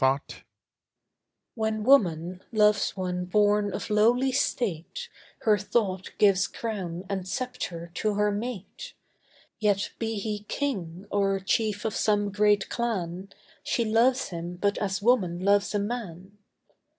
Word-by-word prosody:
ESTHER 135 +2 +1 1.2
When 220 -1 -1
woman 180 - +3
loves 210 -3 +3
one 180 -1 -2
born 205 +2 +2
of - - -5
lowly 240 +5 +4
state, 245 - -2 0.3
Her 210 -2 +3
thought 195 -2 -1
gives 195 -2 +4
crown 190 -6 -4
and 190 -2 -3
sceptre 180 -8 -4
to 210 +4 -1
her 210 0 +2
mate; 235 - -6 0.6
Yet 205 -2 +1
be 225 -1 -2
he 210 0 -3
king, 190 - -3
or 195 -1 +1
chief 210 +2 0
of 220 - -1
some 205 -1 +1
great 205 0 +3
clan, 195 -6 -3 0.3
She 235 - 0
loves 245 +4 +3
him 170 0 -5
but 200 +3 0
as 195 -1 -2
woman 195 -8 +2
loves 200 +2 +2
a - - +2
man. 200 -3 -5
205 Hz, 130 wpm, -27 LUFS, 185-220 Hz, 1.2 s, lowly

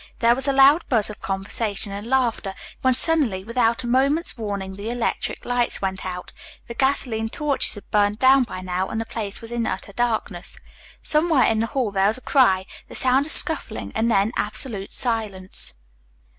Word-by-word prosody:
There 235 0 +4
was 265 +3 -4
a - - +3
loud 275 +4 +5
buzz 220 -5 +2
of 210 - -12
conversation 200 +2 -3
and 200 +3 -6
laughter, 235 -6 0 0.3
when 260 -1 +2
suddenly, 260 - +3
without 230 +2 0
a - - -4
moment's 275 +7 +1
warning, 200 -4 -5
the 205 +3 -6
electric 240 -1 -3
lights 245 -1 0
went 190 -1 -3
out. 180 -1 -7 0.3
The 235 - -8
gasoline 235 -4 0
torches 290 +2 0
had 205 - -11
burned 205 0 +2
down 265 +2 +5
by 185 - -7
now 185 +1 -2
and 220 - -3
the 225 - -3
place 210 -3 -5
was 230 0 -6
in 235 -1 -1
utter 200 - -5
darkness. 220 -6 -2 0.5
Somewhere 305 -3 +3
in 220 -1 +2
the 225 - 0
hall 240 -3 -2
there 195 0 +2
was 215 - +1
a - - -12
cry, 190 -11 +3 0.2
the - - -10
sound 260 +2 +3
of - - +1
scuffling 285 -8 +1
and 225 +2 0
then 205 0 +2
absolute 210 -1 -1
silence. 210 - 0
225 Hz, 185 wpm, -22 LUFS, 200-260 Hz, 0.5 s, loud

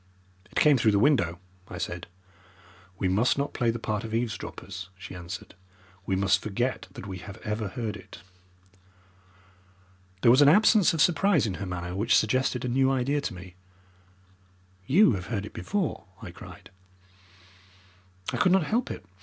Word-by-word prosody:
"It - - -22
came 150 -4 +5
through 110 -2 +3
the - - +4
window," 100 - +2 0.3
I 90 - -8
said. 85 0 -5 0.9
"We 95 - 0
must 105 +9 +2
not 140 +1 -2
play 120 -2 +1
the 115 - -1
part 110 -1 -3
of 110 0 -4
eavesdroppers," 95 -5 -5
she 95 -1 -9
answered. 90 +1 -8 0.5
"We 95 - +1
must 95 0 +2
forget 120 +5 -2
that - - -9
we 95 -2 -6
have 95 +1 -10
ever 105 0 -2
heard 110 +2 -4
it." - - -13 2.0
There 115 - +7
was 130 +4 +6
an 145 - +8
absence 210 0 +5
of 160 - +1
surprise 175 -3 +3
in 100 - -2
her 100 - -3
manner 90 0 -5
which 110 +5 +2
suggested 125 +3 +1
a - - -1
new 130 +2 +2
idea 135 +2 0
to 140 - -4
me. 90 0 -11 1.3
"You 185 +5 +6
have 95 -4 -3
heard 100 -4 -3
it - - -10
before," 200 -6 -2
I - - -8
cried. - - -13 1.6
"I - - -1
could 185 - +3
not 190 -2 +4
help 235 - -1
it. - - -7
115 Hz, 170 wpm, -27 LUFS, 95-140 Hz, 2.0 s, an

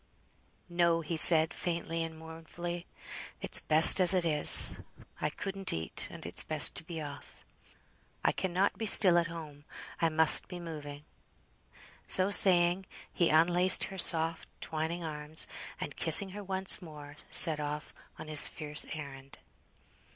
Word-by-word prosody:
"No," 170 -1 -3
he 165 +1 -8
said, 160 0 +7
faintly 165 -1 -7
and 165 -1 -9
mournfully. 165 +2 -11 0.5
"It's - - -1
best 160 +4 +5
as 185 +1 +5
it 180 -2 -3
is. 150 -3 +2 0.4
I - - -4
couldn't 195 +4 -6
eat, 80 0 -7
and - - -13
it's - - -1
best 155 -4 -1
to - - -3
be 165 0 -11
off. 145 -2 -14 0.8
I - - 0
cannot 190 +1 -5
be 220 - -4
still 185 -3 +7
at 170 - -5
home. 155 -4 -14 0.4
I 165 - -1
must 160 0 +3
be 180 -1 -12
moving." 150 -3 -12 1.0
So 190 +2 +4
saying, 180 -1 +2 0.3
he 170 - -2
unlaced 175 +4 +1
her 190 - -11
soft 165 -1 0
twining 160 +2 -8
arms, 150 0 0 0.3
and - - -9
kissing 200 -2 +2
her 205 +2 -12
once 190 +1 -1
more, 150 -4 -15
set 160 -3 +4
off 150 +1 -9 0.2
on - - -13
his 155 -2 +3
fierce 150 -1 -3
errand. 140 -3 -13
165 Hz, 145 wpm, -27 LUFS, 155-175 Hz, 1.0 s, said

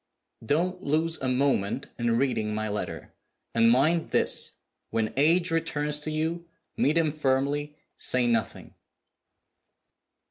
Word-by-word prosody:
"Don't 175 +9 0
lose 160 +1 0
a 130 - -2
moment 125 -6 0
in 120 -1 +1
reading 110 -5 0
my 110 0 -2
letter. 105 0 -5 0.4
And 115 0 +4
mind 155 +7 +3
this, - - +1 0.4
when 110 -1 -1
H. 165 +5 +3
returns 150 -2 -1
to 150 - -5
you 165 +2 -2 0.3
meet 150 +4 +2
him 160 -2 +2
firmly: 145 +1 -1 0.2
say 125 -1 +2
nothing." 115 -3 -1
145 Hz, 120 wpm, -27 LUFS, 120-160 Hz, 0.4 s, And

